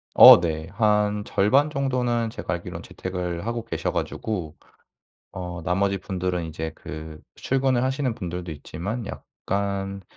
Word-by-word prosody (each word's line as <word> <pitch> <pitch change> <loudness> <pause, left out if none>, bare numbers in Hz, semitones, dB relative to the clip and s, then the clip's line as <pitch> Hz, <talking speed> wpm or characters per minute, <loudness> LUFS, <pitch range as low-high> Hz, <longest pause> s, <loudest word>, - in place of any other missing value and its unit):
어 - - +12
네. 80 -2 -2
한 105 -1 +2
절반 135 +10 +3
정도는 125 -5 0
제가 - - -4
알기론 - - -7
재택을 90 -1 -4
하고 115 0 -2
계셔 - - -2
가지고 90 -8 -3 0.8
어 90 -1 -5
나머지 95 +3 +1
분들은 90 -2 -2
이제 80 0 -4
그 80 0 -8
출근을 130 -2 +1
하시는 130 -1 0
분들도 90 -5 -5
있지만 90 - -5
약간 100 0 -4
100 Hz, 275 characters per minute, -25 LUFS, 90-115 Hz, 0.8 s, 어